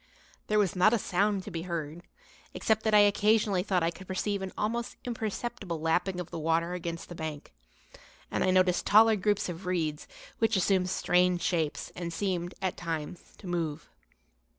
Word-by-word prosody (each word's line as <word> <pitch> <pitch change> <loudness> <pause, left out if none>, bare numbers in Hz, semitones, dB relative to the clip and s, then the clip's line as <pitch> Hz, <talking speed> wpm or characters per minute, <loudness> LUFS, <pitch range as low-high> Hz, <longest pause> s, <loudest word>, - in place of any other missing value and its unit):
There 215 - +2
was 200 -4 +2
not 215 +6 +5
a - - +2
sound 200 0 0
to - - -8
be 165 - -4
heard, 165 -2 -4 0.5
except 220 -1 +1
that 220 - +2
I 210 - +8
occasionally 205 -1 +3
thought 185 -2 0
I 165 - +1
could 185 +2 -12
perceive 200 +1 -2
an 190 -1 -4
almost 235 +3 -2
imperceptible 220 -5 -4
lapping 175 +3 0
of 180 - -6
the - - -4
water 165 +2 +1
against 170 -1 -5
the - - -8
bank, 155 -3 -6 0.8
and - - 0
I 185 - +2
noticed 185 -1 +3
taller 220 +2 +7
groups 205 +1 0
of 180 +1 -7
reeds 160 -5 -1 0.3
which 225 0 +2
assumed 185 -1 +2
strange 180 -1 +2
shapes 160 -4 -1
and 170 -1 -4
seemed, 175 0 -2
at 185 - -1
times, 165 -1 -5
to - - -14
move. 165 -3 -3
180 Hz, 175 wpm, -29 LUFS, 170-205 Hz, 0.8 s, I